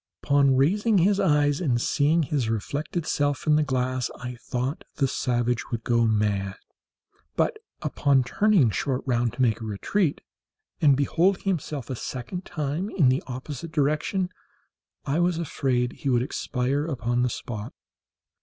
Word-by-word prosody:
Upon 140 -2 +4
raising 205 - +3
his 195 +3 +3
eyes 145 -4 +2
and 125 -8 +1
seeing 155 +6 +2
his 135 -5 -1
reflected 145 - -3
self 145 -3 0
in 150 - +4
the 155 - +4
glass, 130 -3 -1
I 125 0 -6
thought 125 +3 -4
the 135 - +2
savage 120 -2 -1
would 115 -1 -3
go 115 -1 +2
mad; 105 -3 0 0.8
but, - - +1 0.3
upon 135 -2 +2
turning 180 - +3
short 130 +4 -1
round 120 -2 +1
to 125 - -3
make 115 -2 +1
a - - -5
retreat, 140 - -1 0.6
and 145 -4 +5
beholding 170 +7 +2
himself 150 - -2
a - - -2
second 130 +10 -6
time 155 +4 -3
in 150 -12 +3
the 130 +2 +2
opposite 135 +5 -6
direction, 155 +5 0 0.7
I 140 +4 0
was 175 -1 +2
afraid 130 -6 0
he 140 - -4
would 120 -1 +3
expire 130 +2 -1
upon 120 -4 -1
the 125 - +2
spot. 110 -1 -6
135 Hz, 155 wpm, -25 LUFS, 120-155 Hz, 0.8 s, and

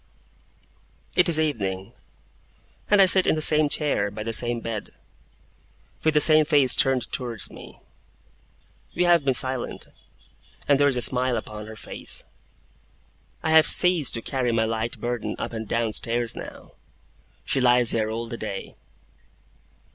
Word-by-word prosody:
It - - +3
is 160 -2 +4
evening; 95 -11 -3 1.0
and 205 - +4
I 195 - +7
sit 185 0 +7
in - - +2
the - - -3
same 155 -1 +3
chair, 145 -10 0
by 105 +1 -8
the 115 +1 -4
same 120 +1 0
bed, 115 -2 -6 1.1
with 155 -1 +1
the - - +5
same 155 +1 +6
face 145 -4 +2
turned 130 -3 0
towards 120 -5 -3
me. - - -14 1.2
We 180 - +1
have 175 -3 +3
been 135 -2 0
silent, 130 0 -3 0.8
and 140 -1 +3
there 145 - +3
is 135 -3 0
a 120 - +2
smile 125 -1 0
upon 105 -1 -8
her 110 - -10
face. 105 - -4 1.2
I 160 - -1
have 160 0 +5
ceased 180 -8 +4
to 115 - -5
carry 130 -3 -2
my 115 -1 0
light 115 +1 -4
burden 120 -1 -4
up - - -6
and 110 -1 -6
down 115 0 -2
stairs 120 +1 -1
now. - - -11 0.7
She 135 - -1
lies 120 -1 +3
here 110 -1 -1
all 115 +1 -5
the 115 0 -8
day. 105 -3 -7
125 Hz, 155 wpm, -23 LUFS, 115-150 Hz, 1.2 s, I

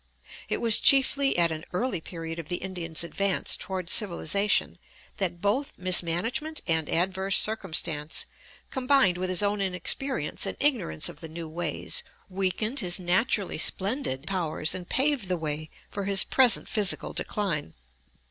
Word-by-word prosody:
It - - 0
was 230 -2 +6
chiefly 275 -1 +4
at 170 -1 +5
an 160 0 -5
early 190 -2 -1
period 165 -1 -7
of 160 - -8
the 175 - -1
Indian's 175 -4 -5
advance 195 +3 0
toward 185 -1 -5
civilization 200 +1 +1 0.4
that 175 -3 -2
both 225 +8 -1
mismanagement 185 - 0
and 160 -3 0
adverse 190 +3 +2
circumstance, 165 -7 -1 0.5
combined 260 -9 +2
with 185 0 -2
his 185 +2 +1
own 205 0 0
inexperience 190 - 0
and - - -4
ignorance 240 - +1
of - - -9
the 160 - -9
new 165 +1 -7
ways, 160 -1 -3 0.3
weakened 195 +7 -1
his 180 -3 +1
naturally 190 +1 0
splendid 190 - +1
powers 165 -4 -1
and 180 -1 -6
paved 270 -6 +1
the 180 -1 -1
way 155 -1 -4 0.2
for 200 -1 -4
his 195 -1 +4
present 255 -3 +4
physical 205 -3 +1
decline. 170 - -3
185 Hz, 145 wpm, -26 LUFS, 170-210 Hz, 0.5 s, was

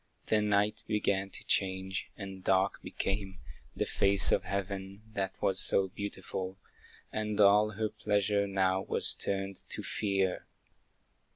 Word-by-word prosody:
The 110 -1 +2
night 105 0 +1
began 100 -2 0
to - - -4
change, 95 0 -1
and 95 -2 -8
dark 95 +1 +2
became 95 -1 -3 0.4
The - - 0
face 100 0 +3
of 90 - +2
heaven, 100 +1 -4
that 95 -2 -3
was 95 -1 +2
so 95 -1 +3
beautiful, 95 -1 -5 0.6
And 105 -1 -2
all 105 +1 +5
her 110 +1 -1
pleasure 100 -1 0
now 95 -1 +1
was - - +5
turned 95 -1 -3
to - - -3
fear. 95 -3 -1
100 Hz, 130 wpm, -31 LUFS, 95-105 Hz, 0.6 s, all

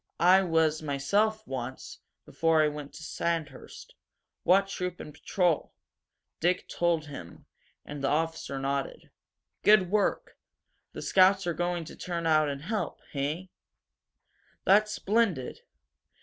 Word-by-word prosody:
I 185 +2 +6
was 160 -3 +1
myself, 200 +10 0
once 130 0 -6 0.3
before 165 -1 +2
I - - +3
went 150 -1 -8
to 160 - -10
Sandhurst. 160 -4 -4 0.5
What 195 +2 +4
troop 180 -2 -4
and 150 - -9
patrol?" 175 -2 0 0.7
Dick 180 +2 +1
told 170 -3 0
him, 115 - -10 0.4
and 145 -1 -7
the - - +2
officer 160 -1 -1
nodded. 135 0 -3 0.5
"Good 200 -4 +5
work!" 210 -1 +1
he - - -23
said. - - -49
"The - - -7
scouts 190 0 +4
are 175 - 0
going 175 0 -2
to - - -10
turn 170 -2 -4
out 155 -2 +3
and 140 0 -5
help, 215 +5 -3
he? 155 +6 -3 1.1
That's 210 +2 +5
splendid! 200 - 0
165 Hz, 135 wpm, -28 LUFS, 145-185 Hz, 1.1 s, I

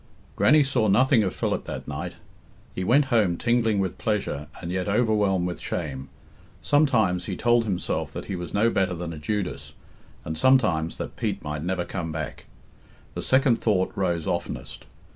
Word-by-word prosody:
Grannie 150 +2 +5
saw 130 -5 +1
nothing 120 +4 +4
of 95 -3 -1
Philip - - -1
that - - -6
night. - - -5 0.6
He 95 - -3
went 135 +9 +4
home 100 -7 +3
tingling 115 -2 +2
with 95 -2 -2
pleasure, 100 - -2
and 85 -1 -5
yet 95 +1 -2
overwhelmed 105 -4 +2
with 90 -1 -4
shame. 70 -5 -4 0.5
Sometimes 110 - +2
he - - -4
told 120 0 +3
himself 95 -4 -2
that - - -6
he 95 - -4
was 90 -1 -6
no 110 +3 +2
better 95 -2 +1
than 85 0 -5
a 80 - -8
Judas, 100 +4 -3 0.5
and 80 - -3
sometimes 85 - +3
that - - -6
Pete - - -2
might 75 0 -4
never 90 +1 -1
come 85 -4 -4
back. 80 -1 -5 0.7
The - - -4
second 130 -2 +3
thought 95 -4 +1
rose 85 -4 -1
oftenest. 85 0 -4
95 Hz, 170 wpm, -25 LUFS, 85-115 Hz, 0.7 s, Grannie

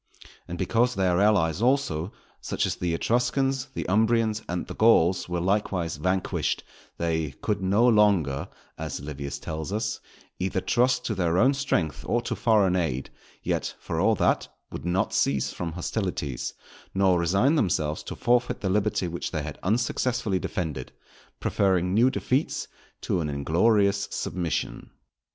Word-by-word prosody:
And 85 - -5
because 115 +7 +1
their 95 -1 +2
allies 100 -5 +3
also, 115 - +1 0.3
such - - -1
as - - 0
the 85 -2 -1
Etruscans, 130 +5 0
the - - -3
Umbrians, 110 +2 +2
and 90 0 -2
the - - -7
Gauls, 90 -6 +4
were 90 0 -1
likewise 90 -3 0
vanquished, 90 +4 -1 0.3
they 80 -4 -1
"could 105 -2 0
now 95 +4 +2
no - - +6
longer" 95 - +3 0.3
as - - -4
Livius 70 -1 -5
tells 80 +3 -5
us, 110 +1 -2 0.4
"_either 95 0 -1
trust 125 +1 +2
to 110 - 0
their 90 -3 +1
own 130 +8 +5
strength 85 - -1
or 120 - +2
to - - -2
foreign 105 -6 +3
aid; 70 -7 -1 0.3
yet, - - -2
for - - -3
all - - +3
that, - - +1 0.2
would 70 - -7
not 90 +2 0
cease 70 -1 +1
from 85 -2 -4
hostilities, 90 - -3 0.4
nor 95 -2 +3
resign 100 - +3
themselves 80 - 0
to - - -7
forfeit 125 +1 +1
the 95 - 0
liberty 105 -2 +1
which 85 0 -4
they 75 -4 -3
had 75 -1 -7
unsuccessfully 115 0 0
defended, 75 -11 -4 0.5
preferring 95 -2 +1
new 120 +5 +5
defeats 130 +2 -1 0.3
to - - 0
an 75 - -2
inglorious 100 +8 +2
submission. 85 -3 -3
95 Hz, 150 wpm, -26 LUFS, 85-110 Hz, 0.5 s, no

